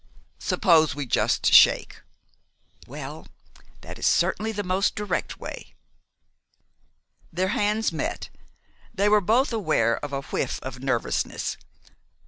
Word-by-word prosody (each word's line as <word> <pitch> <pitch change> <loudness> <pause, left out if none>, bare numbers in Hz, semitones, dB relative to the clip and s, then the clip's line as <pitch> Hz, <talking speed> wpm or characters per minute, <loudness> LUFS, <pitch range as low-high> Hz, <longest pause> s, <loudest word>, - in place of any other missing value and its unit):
"Suppose 160 -5 +3
we 145 -1 -4
just 120 - +1
shake?" - - +5 0.9
"Well, - - -8 0.5
that - - -10
is - - +1
certainly 200 +5 +1
the 205 -1 -4
most 185 +1 0
direct 210 0 -3
way." - - -9 1.6
Their 185 +3 -1
hands 210 +1 0
met. 160 - -4 0.6
They 200 +2 +1
were 210 0 +4
both 235 +7 +2
aware 155 - +1
of 145 - -5
a 140 0 -3
whiff - - -3
of 130 -1 -7
nervousness. 130 -4 -2
185 Hz, 115 wpm, -25 LUFS, 145-210 Hz, 1.6 s, shake